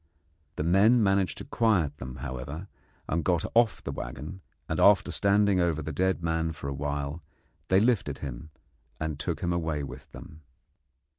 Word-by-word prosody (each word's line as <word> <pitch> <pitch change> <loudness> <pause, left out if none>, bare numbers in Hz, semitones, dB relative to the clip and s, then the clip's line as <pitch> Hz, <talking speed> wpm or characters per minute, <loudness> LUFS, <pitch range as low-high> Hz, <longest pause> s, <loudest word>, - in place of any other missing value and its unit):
The - - -2
men 105 +8 +5
managed 95 -2 +2
to - - -7
quiet 90 -11 +1
them, 65 -1 -7
however, 70 +7 -6 0.4
and 80 +1 0
got 85 -2 +1
out - - -6
of 115 -2 +3
the - - -3
waggon, 70 +10 -7 0.3
and - - -2
after 100 -2 +5
standing 100 -1 +3
over 85 -3 +1
the 80 - -4
dead 95 -1 0
man 80 -1 0
for 75 - -7
a 70 - -2
while 70 +2 -3 0.5
they 95 - +4
lifted 105 - +1
him 70 +1 -7 0.5
and 80 -2 -3
took 85 +1 -3
him 85 -1 0
away 80 -4 -1
with 70 - -9
them. 75 - -12
80 Hz, 170 wpm, -28 LUFS, 75-95 Hz, 0.5 s, men